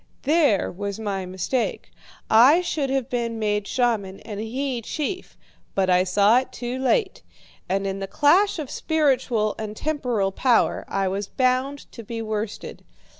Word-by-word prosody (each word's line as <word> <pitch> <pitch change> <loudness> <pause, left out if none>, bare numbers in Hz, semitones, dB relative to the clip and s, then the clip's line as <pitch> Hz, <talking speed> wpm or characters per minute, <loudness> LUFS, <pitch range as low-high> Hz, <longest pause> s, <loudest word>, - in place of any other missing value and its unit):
There 290 - +2
was 200 +3 -5
my 195 -4 -3
mistake. 190 +7 -2 0.4
I 260 +10 +6
should 305 -6 -2
have 265 -2 0
been 235 -3 -2
made 210 -2 -1
shaman, 220 -6 0
and 205 -2 -7
he 250 +3 -3
chief; 315 - -4 0.4
but 190 -1 +2
I 180 +1 +4
saw 205 +5 +4
it 260 0 -7
too 250 0 -5
late, 380 - +1 0.5
and 195 +1 0
in 195 0 -3
the 195 - -4
clash 355 - +3
of 300 -5 -5
spiritual 260 -9 +1
and 215 -1 -5
temporal 250 -10 -1
power 245 +4 +2
I 195 -1 -1
was 195 +2 -2
bound 260 +3 0
to 235 - -9
be 230 +1 -6
worsted. 215 -1 -5
230 Hz, 155 wpm, -23 LUFS, 200-270 Hz, 0.5 s, I